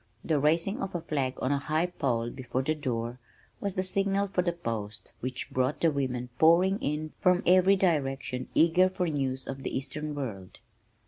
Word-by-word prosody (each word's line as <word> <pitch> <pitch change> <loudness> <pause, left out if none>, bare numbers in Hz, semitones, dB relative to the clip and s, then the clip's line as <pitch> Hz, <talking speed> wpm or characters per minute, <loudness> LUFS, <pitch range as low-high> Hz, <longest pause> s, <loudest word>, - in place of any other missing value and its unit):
The 155 -3 +2
raising 165 +7 +1
of 195 -2 -4
a 175 - -1
flag 135 -5 -1
on 130 - +1
a 140 - +2
high 155 +4 0
pole 120 -9 -1
before 130 0 -3
the 155 - +1
door 125 -5 -3 0.4
was 200 -2 -2
the 185 - 0
signal 195 +1 +1
for 185 - +1
the 175 -1 0
post 110 -10 -5
which 130 0 -4
brought 130 +3 0
the 165 - +4
women 125 -3 -2
pouring 180 +5 +5
in 150 +2 -3
from 180 0 +3
every 185 +2 +6
direction 135 -8 0
eager 175 +3 +5
for 185 -1 -2
news 135 -4 -2
of 135 0 -5
the - - -2
eastern 145 +3 -4
world. 105 -10 -6
150 Hz, 185 wpm, -29 LUFS, 130-175 Hz, 0.4 s, every